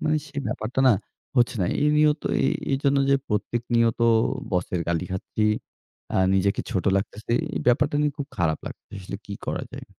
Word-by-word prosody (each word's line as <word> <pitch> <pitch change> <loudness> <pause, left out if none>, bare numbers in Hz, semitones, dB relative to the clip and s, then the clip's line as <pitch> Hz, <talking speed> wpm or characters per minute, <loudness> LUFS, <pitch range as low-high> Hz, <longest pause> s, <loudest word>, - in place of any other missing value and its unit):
মানে 155 0 +2
সেই 140 0 -5
ব্যাপারটা 120 +5 -2
না, - - +7 0.4
হচ্ছে 120 0 +3
না। 90 - +2 0.2
এই 150 - +4
নিয়ত 150 0 +3 0.2
এ - - +4 0.3
এইজন্য 140 +1 +2
যে 140 - +6
প্রত্যেক 110 +3 -1
নিয়ত 115 0 +3 0.5
বসের 90 -1 0
গালি 85 +1 0
খাচ্ছি। 95 +3 -2 0.7
আ - - +2 0.2
নিজেকে 100 +1 +2
ছোট 95 - -1
লাগতেছে। 105 +3 -3 0.2
এই - - -1
ব্যাপারটা 125 +4 +3
নিয়ে 150 -1 +1
খুব 140 - -3
খারাপ 80 -5 +1
লাগতেছে। - - -9
আসলে 100 +1 -6
কি 100 - -5
করা - - -2
যায়? - - -8
115 Hz, 180 wpm, -25 LUFS, 95-140 Hz, 0.7 s, না